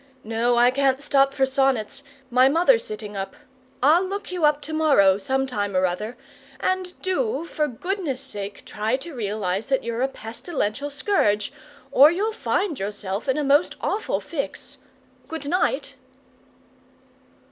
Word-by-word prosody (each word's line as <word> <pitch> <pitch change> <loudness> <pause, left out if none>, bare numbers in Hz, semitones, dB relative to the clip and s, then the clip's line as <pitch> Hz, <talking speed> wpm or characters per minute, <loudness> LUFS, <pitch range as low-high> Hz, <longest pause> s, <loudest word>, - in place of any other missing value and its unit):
No, 230 +2 +1
I 245 +1 +6
can't 270 0 +2
stop 275 -1 +3
for 270 -1 +2
sonnets; 270 -1 0 0.3
my 255 +2 +5
mother's 360 - +4
sitting 210 -1 -6
up. 195 0 -5 0.5
I'll 320 +6 +5
look 395 +1 -5
you 355 -4 +1
up 300 -1 +3
to 315 +2 -6
morrow, 240 -12 +4
sometime 230 -5 -1
or 185 - +3
other, 210 +7 -3 0.4
and 370 +2 -2
do 375 0 -1
for 305 -2 -1
goodness' 325 - -3
sake 205 -7 -7
try 215 +3 -2
and 265 +2 -1
realize 210 - -3
that 270 -1 +1
you're 235 +1 -3
a 265 - +3
pestilential 245 +2 -4
scourge, 215 - +1 0.4
or 285 +3 +8
you'll 410 +7 -1
find 375 - -1
yourself 200 +3 -4
in 265 - +2
a 300 - 0
most 290 +4 +3
awful 430 - -1
fix. 295 -5 -5 0.5
Good 320 -3 -6
night!" 365 +9 0
270 Hz, 145 wpm, -24 LUFS, 215-320 Hz, 0.5 s, or